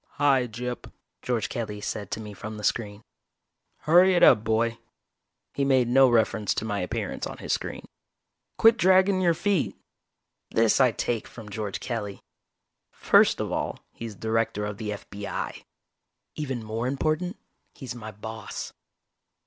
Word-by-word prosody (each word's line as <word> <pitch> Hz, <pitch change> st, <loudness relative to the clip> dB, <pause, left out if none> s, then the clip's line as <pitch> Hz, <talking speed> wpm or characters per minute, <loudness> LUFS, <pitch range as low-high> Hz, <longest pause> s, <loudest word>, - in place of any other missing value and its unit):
"Hi, 135 Hz, -4 st, +3 dB
Gyp," 125 Hz, +2 st, -6 dB, 0.3 s
George 115 Hz, -6 st, -1 dB
Kelly 105 Hz, 0 st, -4 dB
said 105 Hz, -1 st, -4 dB
to -, -, -3 dB
me 105 Hz, -1 st, -8 dB
from 110 Hz, +2 st, -7 dB
the 105 Hz, -, -8 dB
screen. 105 Hz, -2 st, -1 dB, 0.8 s
"Hurry 180 Hz, +4 st, +5 dB
it 175 Hz, -, +3 dB
up, 110 Hz, -4 st, +7 dB
boy." 115 Hz, +1 st, 0 dB, 0.7 s
He 140 Hz, -, 0 dB
made 130 Hz, -3 st, +3 dB
no 130 Hz, +2 st, +6 dB
reference 110 Hz, -2 st, +2 dB
to -, -, -2 dB
my 105 Hz, -2 st, -2 dB
appearance 90 Hz, -, -3 dB
on -, -, -8 dB
his -, -, -2 dB
screen. -, -, -4 dB, 0.7 s
"Quit 225 Hz, +1 st, +6 dB
draggin' 190 Hz, -1 st, +4 dB
your 170 Hz, -2 st, +3 dB
feet!" 195 Hz, -2 st, 0 dB, 0.7 s
This 115 Hz, +2 st, +3 dB
I 130 Hz, -3 st, +5 dB
take 115 Hz, 0 st, -2 dB
from 110 Hz, -3 st, -11 dB
George 105 Hz, -2 st, -4 dB
Kelly. 105 Hz, -5 st, -4 dB, 0.7 s
First -, -, +4 dB
of -, -, -2 dB
all, -, -, -2 dB, 0.2 s
he's 115 Hz, -2 st, -7 dB
Director 110 Hz, +1 st, -1 dB
of 105 Hz, 0 st, -5 dB
the 105 Hz, -2 st, -3 dB
F.B.I. 100 Hz, 0 st, -6 dB, 0.7 s
Even 130 Hz, -6 st, -4 dB
more 110 Hz, +3 st, -3 dB
important, 155 Hz, -, -1 dB, 0.4 s
he's 130 Hz, -3 st, -7 dB
my 110 Hz, -3 st, -8 dB
boss. 110 Hz, +2 st, -7 dB
115 Hz, 150 wpm, -26 LUFS, 105-135 Hz, 0.8 s, up